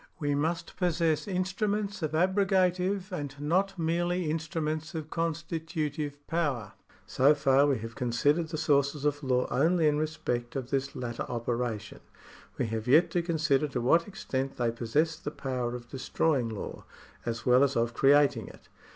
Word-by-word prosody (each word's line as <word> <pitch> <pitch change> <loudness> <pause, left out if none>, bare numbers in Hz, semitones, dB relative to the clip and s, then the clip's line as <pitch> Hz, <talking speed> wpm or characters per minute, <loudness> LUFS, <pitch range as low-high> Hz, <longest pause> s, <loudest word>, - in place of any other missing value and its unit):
We 145 -1 -1
must 165 +4 -2
possess 170 -2 +1
instruments 200 +2 -1
of 155 -1 -2
abrogative, 185 +1 +2
and 145 -6 -4
not 185 +6 +1
merely 175 +2 0
instru 160 +1 -2
ments 155 +1 -3
of 155 -1 -5
constitutive 160 -3 -3
power. 145 -10 -1 0.3
So 140 +4 +4
far 140 0 +4
we 140 -3 +2
have 115 0 -6
considered 145 +8 +1
the 160 0 -4
sources 145 -1 +1
of 145 0 +1
law 125 -2 +1
only 160 +4 +3
in 150 0 +2
respect 125 -6 -3
of 130 -2 -4
this 140 0 -1
latter 120 -2 -4
operation. 115 -3 -3 0.6
We - - 0
have 110 0 -3
yet 155 +7 +5
to 175 - +1
consider 155 -4 +1
to 130 -3 -3
what 165 +8 +3
extent 135 -8 -4
they 120 -2 +1
possess 145 +8 0
the - - -5
power 125 -4 -3
of 120 -1 -8
destroying 135 -1 0
law, 110 -3 -6 0.4
as 115 0 -4
well 125 +2 +6
as 140 -1 +1
of 115 0 +1
creating 145 +2 +4
it. - - -15
150 Hz, 160 wpm, -29 LUFS, 130-165 Hz, 0.6 s, well